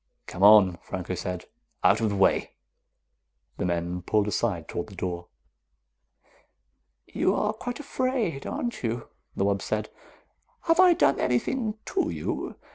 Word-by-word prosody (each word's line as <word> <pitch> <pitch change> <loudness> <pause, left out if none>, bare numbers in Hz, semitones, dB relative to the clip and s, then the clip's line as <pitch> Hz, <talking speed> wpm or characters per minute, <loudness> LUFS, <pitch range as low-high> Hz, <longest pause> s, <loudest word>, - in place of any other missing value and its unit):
"Come 90 - -8
on," 100 -3 +7
Franco 95 0 -5
said. 90 0 -4 0.4
"Out 100 +5 +4
of 110 - +2
the 100 - -2
way." 95 - +2 1.0
The - - -1
men 85 +1 -2
pulled 105 +3 +1
aside 100 -6 -1
toward 85 - -4
the 100 - -12
door. 90 -1 -4 1.8
"You - - 0
are 210 0 0
quite 245 +4 -6
afraid, 255 - -2
aren't 240 -2 -3
you?" 115 0 -3 0.3
the 95 - +1
wub 100 -1 +1
said. 110 0 -3 0.7
"Have 330 +1 +2
I 365 -1 +8
done 140 - +3
anything 215 - 0
to 375 - 0
you? - - -4
110 Hz, 140 wpm, -26 LUFS, -, 1.8 s, I